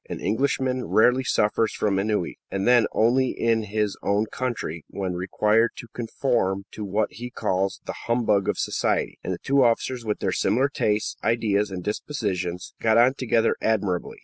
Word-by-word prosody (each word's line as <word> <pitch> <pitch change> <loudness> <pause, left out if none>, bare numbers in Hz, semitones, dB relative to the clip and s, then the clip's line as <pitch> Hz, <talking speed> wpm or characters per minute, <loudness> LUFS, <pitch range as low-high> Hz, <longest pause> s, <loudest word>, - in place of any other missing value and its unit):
An - - -5
Englishman 130 +2 0
rarely 125 +4 +4
suffers 110 -2 +1
from 100 -2 0
ennui, 105 -3 -1
and 95 +2 -2
then 120 -2 +5
only 125 +3 +2
in 115 -1 +2
his 105 -1 -1
own 100 +2 +1
country, 115 - -4
when 95 -2 -4
required 105 +5 +1
to 120 - -10
conform 115 -5 -1
to 105 - -7
what 105 +2 -1
he 120 +2 -7
calls 95 -4 -1
"the - - -4
humbug 110 -5 +2
of - - 0
society"; - - -1
and - - -3
the - - -2
two 140 0 +4
officers, 120 +1 +1
with 105 -2 -1
their - - -1
similar 130 +5 +1
tastes, 105 -6 -1
ideas, 105 -3 +1
and 95 -2 -6
dispositions, 95 -6 -3
got 110 0 +3
on 120 +3 +5
together 120 -4 +1
admirably. 100 -5 -1
110 Hz, 170 wpm, -24 LUFS, 100-120 Hz, -, then